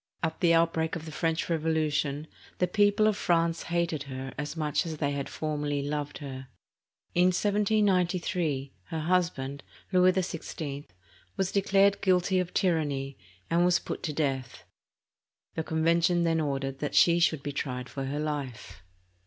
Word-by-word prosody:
At 160 0 -1
the 170 -1 +4
outbreak 165 -1 +1
of 165 -1 -6
the 160 - -7
French 160 +1 -1
Revolution, 155 -3 0 0.3
the 180 - +2
people 205 +3 +3
of 215 -1 +3
France 170 -3 +1
hated 170 -3 -1
her 130 0 -6
as 150 +2 -5
much 150 +1 0
as 160 -3 -5
they 145 -1 0
had 140 -1 -3
formerly 145 -2 -2
loved 145 0 -3
her. 130 -3 -7 0.7
In 175 +1 +4
1793, 185 -7 +1
her 160 -1 -4
husband, 155 -5 0 0.3
Louis 185 0 +5
XVI, 160 -5 -4 0.5
was 190 -1 0
declared 200 0 +3
guilty 185 0 +3
of 180 -1 -2
tyranny, 145 -7 0 0.3
and 170 +1 +2
was 175 -1 +4
put - - -5
to 155 - -2
death. 135 -4 -2 0.9
The - - -2
Convention 170 +2 +2
then 165 -1 +2
ordered 135 -2 -2
that 150 - -3
she 170 0 +6
should 160 -4 +2
be 145 - -3
tried 125 -3 -4
for 135 0 -5
her 140 +2 -3
life. 135 -11 -4
160 Hz, 155 wpm, -28 LUFS, 145-175 Hz, 0.9 s, she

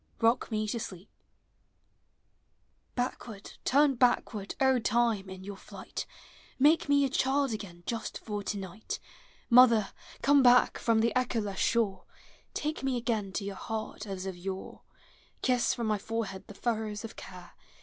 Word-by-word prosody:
ROCK 230 +2 +2
ME 215 -1 -1
TO 230 +3 -2
SLEEP. 190 -2 -8 1.9
Hack 245 0 -2
ward, 205 -4 -9
turn 285 +1 +4
backward, 240 -5 +1
O 265 -1 +4
Time, 230 -4 +1
in 190 0 -8
your 200 +1 -6
flight, - - -7 0.5
Make 295 +3 +4
me 285 -1 +5
a - - +2
child 270 0 +1
again 175 -5 -7
just 230 -1 -3
for 210 -2 -4
tonight! 200 0 -5 0.5
Mother, 235 -4 +6 0.3
come 285 0 +6
back 250 -1 +5
from 225 -1 +3
the 230 +2 +1
echoless 225 -6 0
shore, 225 -5 +1 0.5
Take 305 +1 -2
me 265 -2 0
again 225 -5 -1
to 200 - -2
your 200 - -3
heart 215 +1 -5
as 190 -1 -5
of 190 -1 -4
yore; 190 +2 -6 0.6
Kiss 250 -2 +2
from 235 - -2
my 215 -1 +1
forehead 210 -3 -4
the 205 - -11
furrows 220 -2 -2
of 225 - -9
care. 180 -2 -11
225 Hz, 150 wpm, -30 LUFS, 200-250 Hz, 1.9 s, Mother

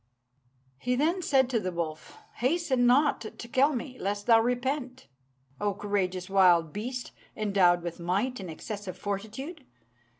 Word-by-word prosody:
'" - - -40 0.3
He 250 0 0
then 325 +8 +1
said 270 -6 +3
to 235 - +2
the 185 -3 -3
wolf, 165 -3 -5 0.2
"Hasten 260 -1 +2
not 280 +4 +4
to 230 +1 -8
kill 275 +4 +3
me, 255 +1 -6
lest 205 +1 -2
thou 230 -2 +6
repent, 255 +2 -2 0.5
O 205 -1 0
courageous 190 -3 -2
wild 175 -5 +4
beast, 245 +4 -4 0.3
endowed 190 -5 +3
with 170 0 -5
might 200 +9 -1
and 185 -3 -7
excessive 200 +3 -6
fortitude! 220 - -5
220 Hz, 145 wpm, -28 LUFS, 190-260 Hz, 0.5 s, thou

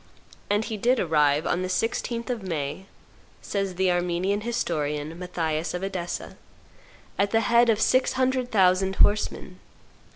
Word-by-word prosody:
And 205 +2 +1
he 220 - -4
did 245 +4 +2
arrive 150 -2 +2
on 180 - 0
the 185 - -2
16th 230 +5 -2
of 240 -3 -3
May, 165 0 -4 0.6
says 195 -2 -2
the 185 0 +2
Armenian 180 +3 0
historian, 160 -8 -2
Matthias 165 -3 -2
of 180 - -4
Edessa, 185 -3 -5 0.8
at 200 0 +2
the 225 +2 +2
head 235 +2 +4
of 220 -2 +3
six 255 +3 +2
hundred 255 -1 0
thousand 190 -2 +3
horsemen. 205 -3 +1
190 Hz, 140 wpm, -25 LUFS, 175-225 Hz, 0.8 s, head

